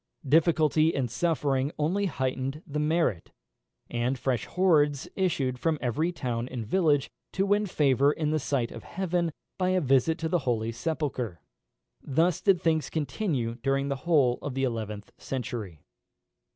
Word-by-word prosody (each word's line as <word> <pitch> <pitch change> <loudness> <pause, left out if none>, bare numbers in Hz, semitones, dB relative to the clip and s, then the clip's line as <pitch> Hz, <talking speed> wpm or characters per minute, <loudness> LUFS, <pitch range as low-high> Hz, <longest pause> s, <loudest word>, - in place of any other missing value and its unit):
Difficulty 160 +1 +3
and 125 -4 -1
suffering 145 -3 0
only 185 +7 +1
heightened 135 0 -3
the 150 -1 -3
merit, 150 - +1 0.6
and 120 +2 -1
fresh 130 -1 -1
hordes 150 -7 +2
issued 140 -9 0
from 160 +1 +1
every 150 +8 0
town 120 -7 -3
and 120 -3 -5
village, 150 - +2 0.2
to 195 - +1
win 205 +1 +2
favour 140 -4 +3
in 150 0 -1
the 155 - +1
sight 130 -4 -1
of 115 - -8
heaven 175 -2 -1 0.3
by 185 0 +2
a 185 0 +3
visit 135 +1 +2
to 160 - -2
the 175 +2 +1
holy 115 -4 -1
sepulchre. 125 - -3 0.6
Thus 160 +5 +1
did 195 -3 +4
things 160 -3 +1
continue 135 - -2
during 135 +1 0
the 140 - -1
whole 135 -5 +2
of 140 -3 -5
the 135 - 0
eleventh 110 -4 -3
century. 110 - -5
145 Hz, 150 wpm, -28 LUFS, 125-165 Hz, 0.6 s, did